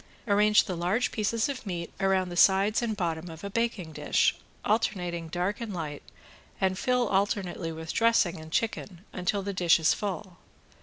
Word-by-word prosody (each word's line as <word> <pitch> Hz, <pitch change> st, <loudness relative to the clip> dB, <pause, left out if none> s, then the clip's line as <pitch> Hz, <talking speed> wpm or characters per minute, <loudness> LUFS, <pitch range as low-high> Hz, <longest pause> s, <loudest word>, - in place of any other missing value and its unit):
Arrange 210 Hz, +1 st, +5 dB
the 185 Hz, -, -4 dB
large 180 Hz, +8 st, 0 dB
pieces 220 Hz, 0 st, 0 dB
of 275 Hz, -3 st, -5 dB
meat 175 Hz, -5 st, -5 dB
around 190 Hz, -2 st, +2 dB
the 175 Hz, -, -6 dB
sides 195 Hz, +5 st, +4 dB
and 220 Hz, -3 st, -2 dB
bottom 170 Hz, -2 st, -2 dB
of 160 Hz, +2 st, -10 dB
a 200 Hz, -, -5 dB
baking 225 Hz, -7 st, -1 dB
dish, -, -, +2 dB, 0.3 s
alternating 180 Hz, -6 st, 0 dB
dark 180 Hz, +7 st, -2 dB
and 215 Hz, -5 st, -4 dB
light, 150 Hz, -4 st, -5 dB, 0.6 s
and 190 Hz, 0 st, +1 dB
fill 250 Hz, -2 st, +1 dB
alternately 195 Hz, -4 st, 0 dB
with 160 Hz, 0 st, -6 dB
dressing 230 Hz, -7 st, +3 dB
and 160 Hz, 0 st, -11 dB
chicken 200 Hz, -3 st, -2 dB
until 190 Hz, +2 st, -1 dB
the 200 Hz, +1 st, -3 dB
dish 175 Hz, -3 st, +4 dB
is 160 Hz, -, +4 dB
full. 190 Hz, -3 st, -5 dB
190 Hz, 170 wpm, -28 LUFS, 175-215 Hz, 0.6 s, Arrange